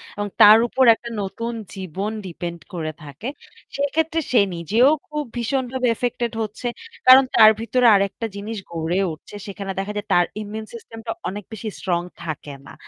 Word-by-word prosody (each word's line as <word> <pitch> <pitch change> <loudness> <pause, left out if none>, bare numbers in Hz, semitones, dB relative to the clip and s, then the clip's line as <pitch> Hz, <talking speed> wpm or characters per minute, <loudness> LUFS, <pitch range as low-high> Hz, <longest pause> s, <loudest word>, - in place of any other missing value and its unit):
এবং 205 0 -3
তার 215 +1 +10
উপর 265 - +2
একটা 235 - -9
নতুন 230 +4 -4 0.2
জীবন 190 +2 -4
ডিপেন্ড 170 -1 -6
করে 155 -2 -3
থাকে। 145 - -8 0.5
সেক্ষেত্রে 315 +3 0
সে 240 - +5 0.2
নিজেও 220 - +3 0.2
খুব 300 0 -3
ভীষণভাবে 255 +1 -1
ইফেক্টেড 240 0 -2
হচ্ছে। 215 +3 -4 0.4
কারণ 260 +1 +10
তার 215 -1 +9
ভিতরে 245 +2 +1
আরেকটা 200 +3 0
জিনিস 215 +2 -5
গড়ে 170 +2 -1
উঠছে। 160 +6 -13
সেখানে 200 -1 -5
দেখা 195 +2 -3
যায় 205 +1 -4
তার 175 - +5 0.2
ইমিউন 215 +1 -6
সিস্টেমটা 225 0 -8 0.2
অনেক 205 +2 -6
বেশি 220 +1 -5
স্ট্রং 175 -3 -1 0.2
থাকে 150 -3 -6
না। 140 - -11
215 Hz, 160 wpm, -22 LUFS, 185-240 Hz, 0.5 s, তার